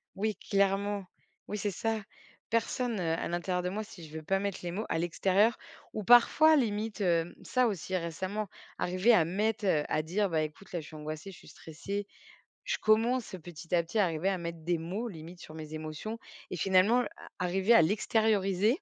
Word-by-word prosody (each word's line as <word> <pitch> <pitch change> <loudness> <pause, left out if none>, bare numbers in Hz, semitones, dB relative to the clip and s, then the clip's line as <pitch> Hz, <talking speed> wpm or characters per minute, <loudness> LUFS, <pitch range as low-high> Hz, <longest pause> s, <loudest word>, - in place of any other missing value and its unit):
oui 210 +1 -1
clairement, 200 0 +1 0.4
oui 210 - -3
c'est 205 +1 0
ça 225 +4 -1 0.5
personne, 230 -1 0
heu 165 -2 0
à - - -2
l'intérieur 180 +1 -1
de 180 - -2
moi 215 +3 -3
si 175 -7 -11
je 155 - -12
veux 155 - -7
pas 195 +4 +1
mettre 200 -1 -2
les 175 - -3
mots 215 +5 -3
à 165 - 0
l'extérieur 190 +6 +2 0.4
ou 215 - -3
parfois 270 +8 +7
limite, 215 -4 0
hem, 170 -2 +1
ça 255 -1 +2
aussi 190 -2 -3
récemment, 185 +5 -3 0.3
arriver 185 +6 +3
à 165 -7 +5
mettre, 210 +4 -1
heu, 150 -5 +3
à 155 - +1
dire: 195 +6 0
«Bah 160 -2 +1
écoute 155 +6 -6
là 175 - -2
je 155 - -9
suis 155 - -11
angoissée, 155 +4 -6
je - - -13
suis - - -15
stressée». 200 +6 -6 0.6
Je - - 0
commence 225 +1 +2
petit 175 0 -6
à 170 - +4
petit 175 +7 -3
à 205 - +5
arriver 165 +2 0
à 190 -2 0
mettre 170 -1 -5
des 170 0 0
mots, 195 +9 -3
limite 170 -1 -10
sur 155 - -10
mes 155 0 -7
émotions 155 +9 -5 0.3
et - - -2
finalement 190 +7 +4
a - - -1 0.4
arriver 190 +6 +3
à 230 - +8
l'extérioriser. 205 +1 +2
190 Hz, 200 wpm, -30 LUFS, 170-215 Hz, 0.6 s, à